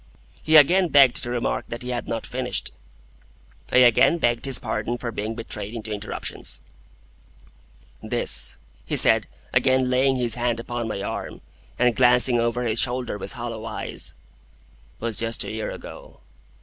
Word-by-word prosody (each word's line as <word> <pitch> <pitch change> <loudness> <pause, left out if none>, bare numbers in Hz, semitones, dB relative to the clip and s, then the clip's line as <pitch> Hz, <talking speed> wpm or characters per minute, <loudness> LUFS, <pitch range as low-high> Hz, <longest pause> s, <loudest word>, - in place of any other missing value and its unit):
He 155 - +2
again 180 +5 +6
begged 140 -5 +5
to 120 - -4
remark 120 -1 -1
that 120 +2 -7
he 125 - -6
had 120 -1 -3
not 115 - -3
finished. 125 0 -3 1.0
I - - +3
again 125 +6 +6
begged 120 -6 0
his 135 -1 +1
pardon 110 0 -3
for 120 -1 -4
being 110 +1 -4
betrayed 115 -1 -6
into 110 -1 -6
interruptions. 100 -11 -4 1.4
"This," - - -1 0.3
he - - -3
said, - - +5 0.3
again 130 -1 +3
laying 130 +1 +3
his 120 -3 +1
hand 120 -1 -1
upon 120 0 -4
my 100 -3 -4
arm, - - -5 0.4
and 125 -2 +3
glancing 125 -1 +4
over 120 +1 0
his 115 -1 +1
shoulder 125 -4 -2
with - - -6
hollow 115 -2 -6
eyes, 115 - -5 0.8
"was 115 -2 -2
just 115 0 0
a - - -6
year 110 0 -4
ago. - - -10
120 Hz, 155 wpm, -24 LUFS, 115-125 Hz, 1.4 s, again